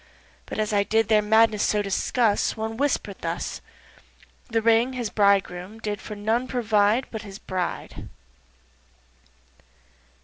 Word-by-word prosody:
But - - -6
as 215 0 -1
I 205 - +4
did 220 +1 +1
their 215 -1 +5
madness 220 0 +3
so 210 -1 +1
discuss 205 +3 +1
One 220 0 -3
whisper'd 285 +4 -1
thus, - - -4 0.9
"This 225 -1 0
Ring 230 +2 +4
the 230 -4 -3
Bridegroom 200 -1 +1
did 210 -2 -4
for 210 - -7
none 220 +5 0
provide 220 -1 +2
But 220 - -5
for 220 - -11
his 195 -1 -9
bride." 185 -4 -5
215 Hz, 135 wpm, -24 LUFS, 205-225 Hz, 0.9 s, their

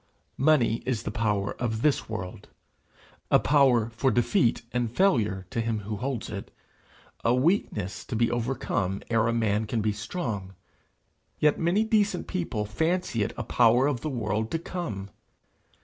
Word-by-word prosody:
Money 135 -6 +3
is 125 -4 -2
the - - -3
power 105 -3 0
of 115 -2 -2
this 150 -6 +1
world 90 -5 -6 1.0
power 130 -6 +4
for 115 +4 +1
defeat 120 - +2
and 120 -2 0
failure 110 - +2
to 115 - -1
him 115 -2 -1
who 105 +1 -4
holds 125 0 -3
it 100 -2 -6 0.7
a 115 +2 +3
weakness 125 - 0
to - - -5
be 115 +1 +2
overcome 115 -5 -1
ere 115 0 +3
a - - +2
man 110 -2 +1
can 115 +2 -1
be 105 0 0
strong; 105 - -4 0.8
yet 150 -1 +3
many 175 +6 +2
decent 215 -2 +1
people 165 - -2
fancy 160 - -1
it 100 - 0
a - - -2
power 120 +2 +4
of 140 -5 0
the 155 - -2
world 110 -4 -1
to 165 - -1
come! 115 - -5
115 Hz, 155 wpm, -27 LUFS, 105-140 Hz, 1.0 s, power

